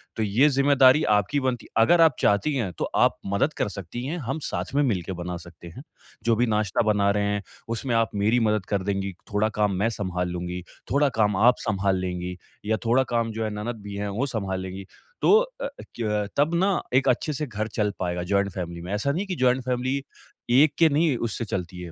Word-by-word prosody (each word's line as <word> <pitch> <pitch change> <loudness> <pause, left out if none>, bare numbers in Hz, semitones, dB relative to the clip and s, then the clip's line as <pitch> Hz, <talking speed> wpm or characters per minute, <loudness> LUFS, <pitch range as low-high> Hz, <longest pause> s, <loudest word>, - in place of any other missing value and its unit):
तो 110 - -1
ये 110 +8 +4
ज़िम्मेदारी 140 +1 +5
आपकी 105 +8 +1
बनती 130 -3 -2
है, - - +1
अगर 170 +8 +5
आप 165 -1 +5
चाहती 105 +9 +2
हैं 110 -9 -1
तो - - 0 0.2
आप - - 0 0.2
मदद 140 +10 +1
कर - - 0
सकती 100 +5 -6
हैं 160 +6 -3
हम 135 +3 -3
साथ - - -4
में 145 - +4
मिलके 95 - -1
बना 90 0 -4
सकते 85 0 -13
हैं। 130 - -9 0.4
जो 115 -1 +3
भी 120 - +2
नाश्ता 105 -1 +1
बना 100 -1 +2
रहे 105 0 0
हैं 105 - -2 0.3
उसमें 115 +1 -1
आप 115 -2 +2
मेरी 105 +4 +2
मदद 105 -3 0
कर 100 -2 -1
देंगी, 100 0 -2 0.2
थोड़ा 105 +1 +2
काम 105 -2 +2
मैं 110 +3 +2
सँभाल 90 -2 -2
लूँगी, 90 0 -4 0.3
थोड़ा 145 +1 +3
काम 105 -2 +3
आप 120 +5 +5
सँभाल 100 -2 +1
लेंगी, 90 0 -4 0.3
या 110 +1 +1
थोड़ा 125 +3 +4
काम 115 -1 +1
जो 110 +1 -3
है - - -1
ननद 115 0 -5
भी 100 -1 -7
है 100 0 -3
वो 115 +7 -1
सँभाल 95 -3 -2
लेंगी। 95 +1 -7 0.4
तो - - +4 0.3
अ, - - -1 0.3
क्यों 115 -3 -2
अ, - - -6
तब 150 +4 +2
ना 190 +2 +2
एक 130 +1 +3
अच्छे 140 +5 0
से 150 +2 -2
घर 110 -2 -3
चल 105 -1 -1
पाएगा 90 -1 -2
जॉइंट 100 +2 +1
फैमिली 85 -1 -5
में 90 - -7
ऐसा 105 +7 0
नहीं 165 +6 -1
है - - -10
कि 185 - -3
जॉइंट 130 -2 +2
फैमिली 130 +2 -1 0.5
एक 140 +3 +5
के 165 -1 +6
नहीं 150 -1 +2
उससे 115 +1 -4
चलती 90 -2 -4
है 85 - -7
110 Hz, 225 wpm, -25 LUFS, 95-130 Hz, 0.5 s, के